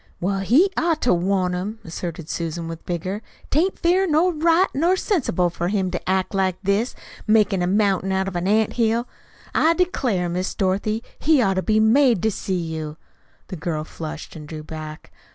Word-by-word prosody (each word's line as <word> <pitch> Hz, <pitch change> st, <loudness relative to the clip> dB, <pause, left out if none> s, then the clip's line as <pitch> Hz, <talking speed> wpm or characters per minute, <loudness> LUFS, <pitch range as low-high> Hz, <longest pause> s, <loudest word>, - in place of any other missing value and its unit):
"Well, 195 Hz, +2 st, 0 dB
he 275 Hz, -, +4 dB
ought 330 Hz, -2 st, +1 dB
to 245 Hz, -, +4 dB
want 180 Hz, +1 st, +1 dB
'em," 195 Hz, +5 st, -3 dB
asserted 170 Hz, -1 st, -6 dB
Susan 165 Hz, 0 st, -3 dB
with 165 Hz, 0 st, -7 dB
vigor. 185 Hz, +4 st, -3 dB, 0.3 s
"'Tain't 345 Hz, +7 st, +2 dB
fair 365 Hz, +3 st, +2 dB
nor 335 Hz, +3 st, +3 dB
right 330 Hz, +3 st, +4 dB
nor 340 Hz, +6 st, +2 dB
sensible 250 Hz, -, 0 dB
for 175 Hz, 0 st, -2 dB
him 190 Hz, -1 st, 0 dB
to 180 Hz, -, -4 dB
act 190 Hz, 0 st, 0 dB
like 190 Hz, -2 st, +1 dB
this, 200 Hz, +5 st, 0 dB, 0.3 s
makin' 210 Hz, -3 st, +3 dB
a 175 Hz, -, +1 dB
mountain 195 Hz, -1 st, +1 dB
out 190 Hz, 0 st, 0 dB
of 195 Hz, -, -5 dB
an 175 Hz, +1 st, -1 dB
ant 215 Hz, +1 st, +2 dB
hill. 230 Hz, +1 st, +1 dB, 0.5 s
I 330 Hz, +1 st, +3 dB
declare, 250 Hz, -, 0 dB
Miss 180 Hz, +2 st, -2 dB
Dorothy, 205 Hz, +4 st, 0 dB, 0.2 s
he 310 Hz, -2 st, +4 dB
ought 195 Hz, -6 st, +3 dB
to 190 Hz, -, 0 dB
be 215 Hz, +2 st, +2 dB
made 230 Hz, -1 st, +4 dB
to 220 Hz, -, +2 dB
see 190 Hz, -1 st, -2 dB
you." 160 Hz, -2 st, -5 dB, 0.5 s
The 185 Hz, -, -5 dB
girl 155 Hz, -1 st, -3 dB
flushed 155 Hz, 0 st, -8 dB
and 150 Hz, -2 st, -9 dB
drew 155 Hz, 0 st, -7 dB
back. 155 Hz, 0 st, -8 dB
195 Hz, 190 wpm, -22 LUFS, 175-240 Hz, 0.5 s, he